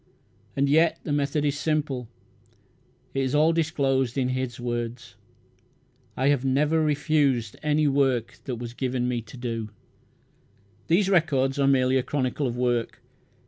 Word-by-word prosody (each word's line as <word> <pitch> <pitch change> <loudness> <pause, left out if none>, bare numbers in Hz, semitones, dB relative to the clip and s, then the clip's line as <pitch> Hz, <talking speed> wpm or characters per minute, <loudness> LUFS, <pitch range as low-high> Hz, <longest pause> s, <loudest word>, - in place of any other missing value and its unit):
And 140 0 +2
yet 160 +4 +3
the - - -4
method 145 +1 0
is 145 0 0
simple. 145 -6 -1 1.1
It 135 - -1
is 130 +1 0
all 155 +2 +4
disclosed 140 -6 0
in 130 -1 +1
his 130 -1 -3
words, 120 0 -4 1.0
"I 130 +2 +2
have 140 -3 +2
never 150 +4 +2
refused 145 -6 +1
any 150 0 +2
work 135 -4 +1
that 130 - -3
was 120 0 -7
given 125 -1 -1
me 120 -1 -1
to 115 +3 -13
do." 115 -3 -4 1.2
These 185 +4 +3
records 145 -7 +2
are 140 - +3
merely 130 -1 +3
a - - +2
chronicle 135 +1 -1
of 120 0 -4
work. 120 -2 -1
135 Hz, 145 wpm, -25 LUFS, 125-150 Hz, 1.2 s, all